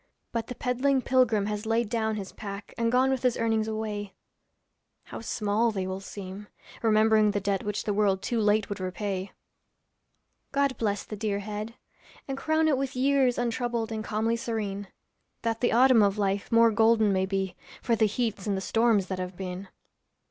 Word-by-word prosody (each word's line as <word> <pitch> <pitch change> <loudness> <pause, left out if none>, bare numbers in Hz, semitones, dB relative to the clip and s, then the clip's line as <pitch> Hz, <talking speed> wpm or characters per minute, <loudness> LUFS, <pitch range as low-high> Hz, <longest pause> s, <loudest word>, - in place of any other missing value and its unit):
But 230 -1 -2
the 250 - -6
peddling 255 +2 +1
pilgrim 240 -6 +3
has 210 +1 -3
laid 225 +1 +1
down 220 0 -1
his 195 -2 -6
pack 200 -1 -8
And 230 0 0
gone 260 +2 +3
with 265 -2 -1
his 250 -2 +1
earnings 225 -1 +1
away; 215 -2 -4 0.9
How - - -8
small 215 +1 0
will 190 -3 -3
they - - -14
seem, 200 +1 -8 0.3
remembering 220 -1 +4
the 205 0 0
debt 200 -1 -1
Which 210 0 -2
the 210 - -1
world 200 -2 +1
too 235 - -1
late 210 -1 +2
would 205 - -5
repay. 185 +1 -3 1.2
God 280 -2 +1
bless 205 -2 0
the 215 - -7
dear 205 -1 -1
head! 210 +2 -5 0.5
and 270 - -3
crown 315 +3 +1
it 280 -4 +2
with 275 -1 -3
years 265 -1 +3
Untroubled 235 -1 -1
and 220 -1 -3
calmly 220 +1 0
serene; 210 -4 -3 0.6
That 225 -1 -1
the 245 - +2
autumn 250 -1 +6
of 200 0 +2
life 200 -1 -1
more 230 0 +6
golden 220 -1 +4
may 190 0 +1
be 190 -2 -2 0.3
For 235 - +2
the 220 -1 +3
heats 215 -2 -2
and 200 -2 0
the - - -1
storms 225 0 +2
that 190 -1 -4
have 180 0 -5
been. 185 0 -5
215 Hz, 185 wpm, -27 LUFS, 200-235 Hz, 1.2 s, autumn